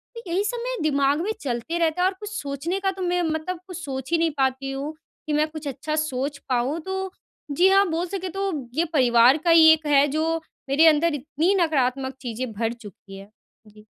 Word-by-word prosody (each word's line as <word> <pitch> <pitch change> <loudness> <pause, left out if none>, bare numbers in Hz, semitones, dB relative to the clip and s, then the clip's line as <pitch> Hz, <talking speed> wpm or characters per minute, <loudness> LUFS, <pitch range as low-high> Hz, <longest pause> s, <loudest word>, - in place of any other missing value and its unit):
तो 465 - -7
यही 375 +4 +1
सब 485 +3 -2
मेरे - - -3
दिमाग 280 +1 +1
में 415 +5 -1
चलते 255 +6 -3
रहता 330 0 +1
है 365 - +4
और 380 - -1
कुछ 420 -1 -7
सोचने 300 +2 -3
का 385 -1 0
तो 385 - -9
मैं 355 0 0
मतलब 320 +3 -3
कुछ 365 - -7
सोच 265 +1 -5
ही 335 - +4
नहीं 330 -1 +1
पाती 270 0 0
हूँ, 280 +3 -4 0.3
कि 305 - -1
मैं 300 +1 +2
कुछ 310 -1 -8
अच्छा 285 +3 -3
सोच 285 -2 -2
पाऊँ। 255 +6 0
तो 380 +1 -4 0.4
जी 350 +7 +4
हाँ, 390 +1 +5
बोल 330 +2 -1
सके 375 0 -4
तो 390 +2 -2 0.2
ये 330 +3 +2
परिवार 245 0 +5
का 340 - +3
ही 325 -1 +8
एक 315 -1 -3
है 285 0 +5
जो 315 +3 0 0.3
मेरे 295 +4 +4
अंदर 320 +1 +4
इतनी 300 +6 0
नकारात्मक 270 -5 0
चीज़ें 245 0 -4
भर 225 +2 -2
चुकी 200 -4 -13
है। 195 +1 -12 0.4
जी। 210 0 -18
310 Hz, 215 wpm, -24 LUFS, 265-345 Hz, 0.4 s, ही